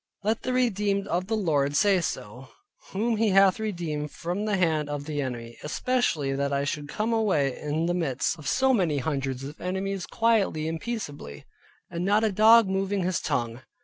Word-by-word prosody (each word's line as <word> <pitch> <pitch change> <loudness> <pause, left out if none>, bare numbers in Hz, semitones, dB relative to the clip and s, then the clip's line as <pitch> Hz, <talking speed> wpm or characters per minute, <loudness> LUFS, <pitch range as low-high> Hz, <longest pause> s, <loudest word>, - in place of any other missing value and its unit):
Let 220 +2 0
the 255 - -2
redeemed 205 -5 +1
of 180 +1 -1
the 220 +1 0
Lord 145 -7 +1
say 195 +1 +4
so, 125 -4 -5 0.4
whom 225 +3 0
He 220 0 +2
hath 195 +1 +5
redeemed 170 -8 -3
from 180 +7 -4
the 210 -2 0
hand 160 -5 +1
of 145 -1 -4
the 150 -1 -2
enemy, 120 -3 -6
especially 155 - 0
that 140 +1 -1
I 140 0 0
should 145 0 -3
come 220 +2 -1
away 170 - +1
in 150 +2 -1
the 175 - 0
midst 160 -2 -1
of 145 - -8
so 265 0 +3
many 175 - +1
hundreds 135 -2 -2
of 145 +3 -9
enemies 190 0 -3
quietly 215 -9 +1
and 160 0 -3
peaceably, 145 - -6 0.5
and 170 +1 -3
not 205 +3 +3
a 220 - +2
dog 220 +2 +6
moving 195 0 -1
his 180 0 -1
tongue. 120 -4 -2
175 Hz, 185 wpm, -26 LUFS, 145-210 Hz, 0.5 s, dog